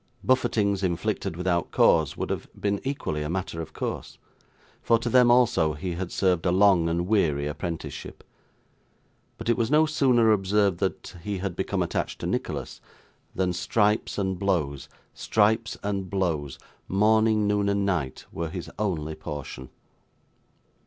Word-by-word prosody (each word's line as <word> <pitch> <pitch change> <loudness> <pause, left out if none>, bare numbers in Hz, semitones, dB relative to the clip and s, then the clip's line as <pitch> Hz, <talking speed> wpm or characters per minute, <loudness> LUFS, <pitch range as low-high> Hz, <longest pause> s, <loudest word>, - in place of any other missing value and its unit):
Buffetings 115 -6 +2
inflicted 85 -2 -2
without 90 -1 0
cause, 80 -4 +3
would - - -3
have - - -3
been 100 -1 -1
equally 135 - -3
a 75 - -3
matter 85 -2 -3
of 80 -1 -8
course; - - -5 0.6
for 115 - +3
to 115 +1 -3
them 125 0 +6
also 120 -11 +4
he 85 +4 -4
had 90 +1 -4
served 90 -3 +1
a - - +3
long 95 -3 +4
and 85 +1 0
weary 80 -9 +1
apprenticeship; 80 +2 -6 1.1
but 115 - -7
it 120 - +3
was 115 -2 0
no 155 +1 +5
sooner 130 -7 +3
observed 100 -2 +2
that 95 - -3
he 100 +2 -3
had 95 -1 -4
become - - -1
attached - - -3
to - - -3
Nicholas, - - -3 0.5
than 90 -1 0
stripes 105 +4 +1
and 95 -3 -1
blows, 85 -8 -1 0.2
stripes 110 +2 +1
and 100 -2 -2
blows, 80 -8 -1 0.3
morning, 110 +2 +3
noon, 105 -1 +1
and 100 0 +1
night, 80 -10 -2
were 85 0 -3
his 90 +1 -7
only 80 -7 -1
portion. 75 -4 -7
95 Hz, 150 wpm, -26 LUFS, 85-105 Hz, 1.1 s, them